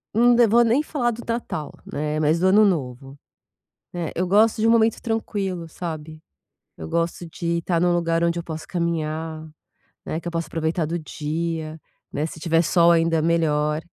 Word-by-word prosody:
Não 240 +1 +5
vou 235 +2 +5
nem 235 +5 +3
falar 275 -6 -1
do 235 +1 -7
Natal, 230 -10 -3
né, 150 +1 -3
mais 155 +2 +2
do 185 - +3
Ano 210 +3 +6
Novo, 135 -5 -2 0.7
né. 175 -2 -3
Eh, - - -11
eu 180 - 0
gosto 215 +3 +3
de 225 - +3
um - - +5
momento 225 -1 +3
tranquilo, 200 -6 -3
sabe? 155 -2 -7 0.6
Eu 80 - -7
gosto 170 +1 -2
de 170 +1 -2
tá 170 0 0
num 175 +1 +2
lugar 170 -1 +1
onde 170 0 +1
eu - - -3
posso 160 -2 -7
caminhar, 160 -2 -3 0.6
né, 160 - -3
que 175 - -6
eu - - -6
possa 165 -1 -2
aproveitar 160 +1 -1
do 170 +2 -2
dia, 160 0 -4 0.3
né, 150 +2 -1
se 160 - -9
tiver 165 0 +2
sol 170 +1 +4
ainda 165 -1 +2
melhor. 155 -2 +1
170 Hz, 185 wpm, -23 LUFS, 155-185 Hz, 0.7 s, Ano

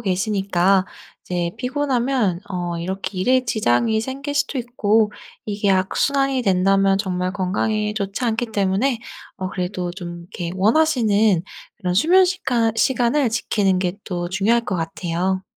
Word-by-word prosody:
계시니까 195 -2 +1 0.4
이제 175 -1 -2
피곤하면 250 -6 0
어 175 -3 -3
이렇게 185 +2 -4
일에 255 +7 +2
지장이 220 - +1
생길 275 +5 -5
수도 290 -1 0
있고 220 -3 +1 0.3
이게 205 -1 -1
악순환이 270 +8 +1
된다면 195 -1 +3
정말 185 -2 -2
건강에 210 +2 -1
좋지 200 +3 -3
않기 230 +1 0
때문에 215 +4 0 0.4
어 185 - -4
그래도 180 -1 -3
좀 175 -2 -7
이렇게 170 0 -6
원하시는 220 - +3 0.3
그런 180 -4 -2
수면 355 - +5
시간 245 -11 0
시간을 255 +3 +2
지키는 205 -4 +1
게 180 -1 0
또 175 -2 -3
중요할 210 +6 +2
것 190 - -2
같아요. 175 +3 -2
205 Hz, 305 characters per minute, -21 LUFS, 185-240 Hz, 0.4 s, 수면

